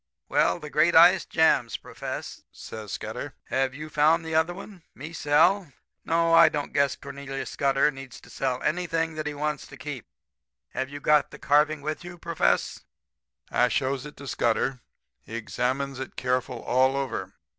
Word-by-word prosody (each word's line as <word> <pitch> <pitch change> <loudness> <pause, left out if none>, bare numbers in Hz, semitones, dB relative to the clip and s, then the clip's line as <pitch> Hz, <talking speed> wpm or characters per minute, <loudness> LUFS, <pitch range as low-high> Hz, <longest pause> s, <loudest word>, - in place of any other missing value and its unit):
"'Well, - - +3
the - - -9
great - - +3
ice - - +7
jams, - - +2
Profess!' - - -7
says 110 -2 -9
Scudder. 110 +6 -6 0.2
'Have 130 0 0
you 155 +2 -7
found 155 +2 +3
the 160 - -4
other 160 +2 +3
one? 190 0 -10
Me 155 +4 -8
sell? 165 +3 +3 0.3
No. 165 0 +2
I - - +8
don't 145 -1 -4
guess 140 -1 +2
Cornelius 140 -1 -7
Scudder 140 +1 +2
needs 135 -3 -10
to - - -16
sell 130 -2 -2
anything 165 -1 0
that 155 -1 -4
he 150 - -4
wants 150 0 -3
to - - -12
keep. 145 -7 -7 0.6
Have 130 0 -3
you 145 +1 -7
got 150 0 +3
the - - -11
carving 150 0 +2
with 155 +3 -4
you, 175 0 -9
Profess?' - - 0 0.7
"I 125 - +3
shows 135 +1 -1
it 150 - -13
to 140 - -9
Scudder. 120 +2 0 0.4
He 115 - -9
examines 130 +4 -2
it 130 - -7
careful 125 -1 -2
all 130 +2 +2
over. 135 -1 -3
140 Hz, 170 wpm, -26 LUFS, 130-155 Hz, 0.7 s, I